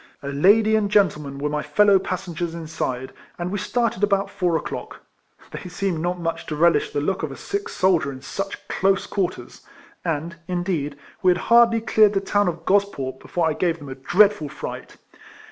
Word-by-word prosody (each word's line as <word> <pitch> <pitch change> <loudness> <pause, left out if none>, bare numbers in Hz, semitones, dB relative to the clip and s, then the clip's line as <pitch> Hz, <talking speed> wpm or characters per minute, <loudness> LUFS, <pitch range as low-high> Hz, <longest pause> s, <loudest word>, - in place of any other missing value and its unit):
A 140 - -4
lady 205 +10 +4
and 210 -2 +1
gentleman 150 -9 +1
were 145 +1 -2
my 150 0 -1
fellow 205 +1 +4
passengers 175 -3 -4
inside, 155 -6 -4 0.2
and 175 +1 -3
we 205 - -2
started 230 -2 -1
about 200 -1 +1
four 175 -3 +1
o'clock. - - -7 0.5
They 180 - -7
seemed 180 -2 -2
not 175 +2 -2
much 165 -1 -3
to 155 - -3
relish 170 +3 +3
the - - -2
look 190 +6 -1
of - - -3
a - - -8
sick 405 0 -4
soldier 175 -7 +2
in 130 0 -10
such 195 +7 -5
close 195 0 +1
quarters; 195 -3 -3 0.4
and, 165 0 -3
indeed, 175 -6 -2 0.2
we 185 - +4
had 180 - +4 0.2
hardly 230 -1 +6
cleared 215 -2 +4
the 195 - +2
town 205 +1 +1
of 165 -1 -3
Gosport 185 -10 0
be - - -15
fore 170 -2 0
I 160 - +1
gave 170 +1 0
them 145 -3 -10
a - - -4
dreadful 175 +5 +3
fright. - - -8
180 Hz, 190 wpm, -23 LUFS, 155-200 Hz, 0.5 s, hardly